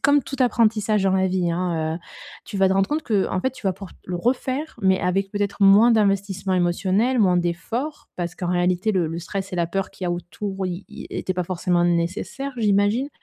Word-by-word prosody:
comme 285 Hz, -1 st, +4 dB
tout 275 Hz, -, -6 dB
apprentissage 220 Hz, -4 st, +2 dB
dans 190 Hz, -, +3 dB
la 190 Hz, 0 st, +2 dB
vie, 180 Hz, -2 st, 0 dB
hein, 165 Hz, -2 st, -1 dB
heu, -, -, -8 dB, 0.5 s
tu 200 Hz, -, -7 dB
vas 195 Hz, -1 st, +4 dB
te -, -, +2 dB
rendre 195 Hz, 0 st, +2 dB
compte 305 Hz, +2 st, -1 dB
qu'en 195 Hz, -6 st, 0 dB
fait, 260 Hz, -, 0 dB
tu 245 Hz, -5 st, -8 dB
vas 190 Hz, -, +2 dB
pouvoir 195 Hz, 0 st, -10 dB
le 180 Hz, -, -5 dB
refaire, 260 Hz, -, -1 dB
mais 190 Hz, -1 st, +3 dB
avec 195 Hz, +2 st, 0 dB
peut-être 205 Hz, -1 st, -1 dB
moins 205 Hz, +5 st, +7 dB
d'investissement 195 Hz, -3 st, +1 dB
émotionnel, 190 Hz, +8 st, +1 dB
moins 185 Hz, -4 st, +4 dB
d'efforts, 230 Hz, -, -3 dB
parce 175 Hz, -1 st, -3 dB
qu'en 180 Hz, -, -3 dB
réalité 180 Hz, +4 st, +1 dB
le 180 Hz, -4 st, +1 dB
le 165 Hz, +1 st, -4 dB
stress 190 Hz, +3 st, -5 dB
et 180 Hz, -, -3 dB
la 170 Hz, -1 st, +1 dB
peur 195 Hz, +2 st, -3 dB
qu'il 185 Hz, -, -8 dB
y -, -, 0 dB
a -, -, 0 dB
autour, 190 Hz, +3 st, -4 dB
ils 180 Hz, +2 st, -5 dB
ils -, -, -9 dB
étaient 185 Hz, -, -3 dB
pas 180 Hz, -1 st, -1 dB
forcément 175 Hz, 0 st, 0 dB
nécessaires, 175 Hz, +11 st, -1 dB
j'imagine. 210 Hz, +5 st, +2 dB
195 Hz, 220 wpm, -23 LUFS, 180-215 Hz, 0.5 s, moins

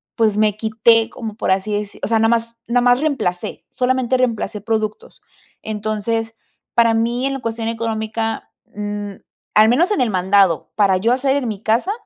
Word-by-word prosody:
pues, 220 Hz, -3 st, +2 dB
me 215 Hz, -1 st, +2 dB
quité, 225 Hz, +1 st, +3 dB
como 220 Hz, -3 st, -7 dB
por 220 Hz, -, -1 dB
así 195 Hz, +2 st, 0 dB
deci 205 Hz, 0 st, -4 dB
o -, -, 0 dB
sea, 225 Hz, -, +3 dB
nada 225 Hz, 0 st, +3 dB
más 230 Hz, 0 st, 0 dB
nada 245 Hz, +1 st, +2 dB
más 245 Hz, +1 st, +4 dB
reemplacé, 265 Hz, -13 st, -2 dB
solamente 255 Hz, 0 st, +1 dB
reemplacé 230 Hz, -4 st, -1 dB
productos. 215 Hz, -1 st, -3 dB, 0.4 s
Entonces, 220 Hz, +1 st, -3 dB, 0.4 s
para 230 Hz, -1 st, +4 dB
mí, 235 Hz, +3 st, 0 dB
en 275 Hz, -, 0 dB
la -, -, -4 dB
cuestión 230 Hz, -2 st, -3 dB
económica, 225 Hz, 0 st, -3 dB, 0.2 s
mm, 205 Hz, -1 st, -4 dB, 0.4 s
al 215 Hz, +1 st, +6 dB
menos 330 Hz, -, +3 dB
en 365 Hz, -, +1 dB
el 245 Hz, -, +2 dB
mandado, 190 Hz, -2 st, +2 dB
para 195 Hz, -3 st, +3 dB
yo 230 Hz, +6 st, +2 dB
hacer 270 Hz, +2 st, +1 dB
en 255 Hz, -4 st, -2 dB
mi 210 Hz, -1 st, -5 dB
casa, 235 Hz, -, +1 dB
225 Hz, 180 wpm, -19 LUFS, 210-235 Hz, 0.4 s, al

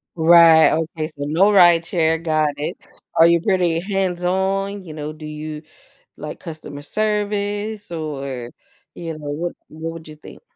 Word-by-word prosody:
Right, 165 Hz, -1 st, +7 dB
okay. 160 Hz, -1 st, -2 dB
So, 145 Hz, -3 st, -8 dB
no 180 Hz, +8 st, +3 dB
rideshare, 165 Hz, -3 st, +4 dB
got 155 Hz, -2 st, +1 dB
it. 150 Hz, -, -4 dB, 0.4 s
Are 165 Hz, -, +7 dB
you 170 Hz, -1 st, +3 dB
pretty 180 Hz, -4 st, +1 dB
hands 190 Hz, -2 st, -2 dB
on? 195 Hz, +2 st, -1 dB
You 160 Hz, -3 st, -9 dB
know, 150 Hz, 0 st, -6 dB
do 155 Hz, 0 st, -11 dB
you 150 Hz, 0 st, -6 dB, 0.6 s
like 150 Hz, +1 st, -8 dB
customer 155 Hz, -4 st, -9 dB
service 205 Hz, +1 st, -2 dB
or, 140 Hz, -6 st, -5 dB, 0.4 s
you 165 Hz, -1 st, -6 dB
know, 145 Hz, -1 st, -8 dB
what 170 Hz, +4 st, -3 dB, 0.2 s
what 160 Hz, +1 st, -6 dB
would 160 Hz, -1 st, -11 dB
you 155 Hz, -, -11 dB
think? 150 Hz, -, -14 dB
165 Hz, 155 wpm, -20 LUFS, 155-190 Hz, 0.6 s, Right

